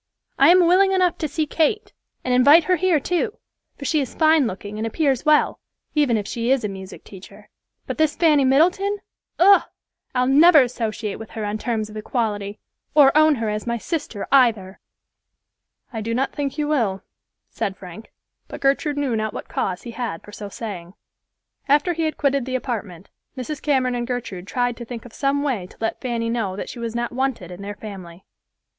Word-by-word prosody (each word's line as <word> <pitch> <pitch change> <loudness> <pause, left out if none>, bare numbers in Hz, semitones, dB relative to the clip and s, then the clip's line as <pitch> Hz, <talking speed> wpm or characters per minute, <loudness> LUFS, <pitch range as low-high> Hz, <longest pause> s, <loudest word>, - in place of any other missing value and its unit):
"I 275 +3 +7
am 360 0 +6
willing 385 +3 +4
enough 365 -2 +2
to 310 - -1
see 305 +2 -1
Kate, 340 +9 0 0.3
and 255 - 0
invite 285 +7 +7
her 365 +3 +2
here 355 -2 +2
too, 405 - -2 0.4
for 280 - -8
she 300 +2 +1
is 265 - -5
fine 315 -4 +4
looking 205 +1 -6
and 225 - -1
appears 275 +3 0
well, 305 0 +3 0.3
even 285 -7 +2
if 205 - -3
she 235 0 -2
is 265 -2 +2
a - - 0
music 190 -1 -9
teacher; 190 -2 -14 0.3
but - - -5
this 310 -1 +2
Fanny 305 -5 +4
Middleton—Ugh! 380 +6 +2 0.5
I'll 250 0 +2
never 300 +2 +7
associate 225 -4 -4
with 225 - -9
her 220 -2 -5
on 210 +1 -3
terms 220 -3 -2
of 215 - -12
equality, 210 -2 -3 0.4
or 285 -2 +6
own 310 0 +5
her 225 -3 -3
as 210 +2 -4
my 235 0 0
sister 235 - -4
either." 225 -8 +3 1.1
"I 225 - -3
do 230 +2 -2
not 265 +2 -1
think 285 -1 -3
you 300 -1 -1
will," 225 -11 0 0.5
said 195 -1 -3
Frank; 185 +4 -11 0.4
but - - -8
Gertrude 280 +2 +1
knew 275 -5 0
not 215 -1 -2
what - - -6
cause 185 -1 -2
he 235 - -7
had 230 -8 -5
for 210 - -13
so 205 -1 -8
saying. 190 -4 -7 0.7
After 295 +5 +3
he 325 -1 -1
had 310 - -2
quitted 275 -3 +1
the 260 - -2
apartment, 205 -9 -5 0.3
Mrs. 275 +3 -5
Cameron 260 -4 +1
and 240 -1 -3
Gertrude 210 -7 -5
tried 245 0 -1
to 240 - -7
think 235 0 -8
of 240 - -13
some 280 +1 0
way 235 -11 -2
to - - -19
let 225 - -3
Fanny 235 -2 -2
know 220 -6 -2
that 200 - -6
she 245 - -8
was 230 -1 -4
not 240 0 -2
wanted 250 -8 -2
in 180 +2 -9
their 205 +1 -6
family. 190 -4 -10
250 Hz, 195 wpm, -22 LUFS, 215-295 Hz, 1.1 s, I